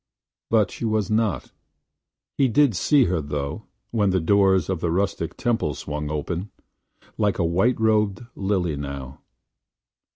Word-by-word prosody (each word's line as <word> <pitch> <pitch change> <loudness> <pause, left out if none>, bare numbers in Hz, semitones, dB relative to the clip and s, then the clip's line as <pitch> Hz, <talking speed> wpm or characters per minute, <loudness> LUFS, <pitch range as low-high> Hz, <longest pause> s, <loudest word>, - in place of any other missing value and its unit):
But 110 -4 +3
she - - -8
was 110 -2 0
not. 110 -2 0 0.8
He 135 - +3
did 125 -1 +3
see 140 - +4
her 90 -6 0
though 70 -1 -4
– - - -49
when 105 -4 +2
the 95 0 +2
doors 95 0 +3
of 95 -3 -2
the 85 - -1
rustic 90 -1 -1
temple 115 - 0
swung 75 0 -5
open 85 +6 -3 0.3
– - - -53 0.3
like 105 -2 +1
a 85 - +1
white 95 +10 +2
robed 110 -1 +1
lily 95 -5 0
now. 70 -2 -7
95 Hz, 155 wpm, -24 LUFS, 80-110 Hz, 0.8 s, see